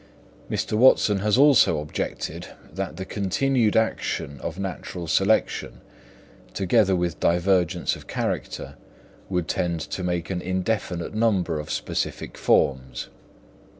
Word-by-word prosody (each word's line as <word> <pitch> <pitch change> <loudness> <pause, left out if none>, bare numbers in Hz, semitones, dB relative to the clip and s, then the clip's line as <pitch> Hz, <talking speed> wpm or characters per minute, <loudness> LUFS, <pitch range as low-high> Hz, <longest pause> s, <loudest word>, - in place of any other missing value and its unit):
Mr. - - -2
Watson 105 -3 +5
has 105 +3 +2
also 135 - +6
objected 75 -5 -4 0.3
that 80 - -4
the 95 - -5
continued 110 +4 +1
action 70 - -1
of 85 - -5
natural 95 -2 -5
selection, 95 +7 +1 0.7
together 95 0 +3
with 85 -2 -2
divergence 90 0 +2
of - - -13
character, - - -3 0.6
would 90 -4 -1
tend 85 -1 -1
to 90 - -5
make 90 0 -2
an 90 -2 -2
indefinite 95 -1 -2
number 100 -8 +1
of 75 - -7
specific - - -3
forms. 65 -3 +1
95 Hz, 115 wpm, -24 LUFS, 85-105 Hz, 0.7 s, also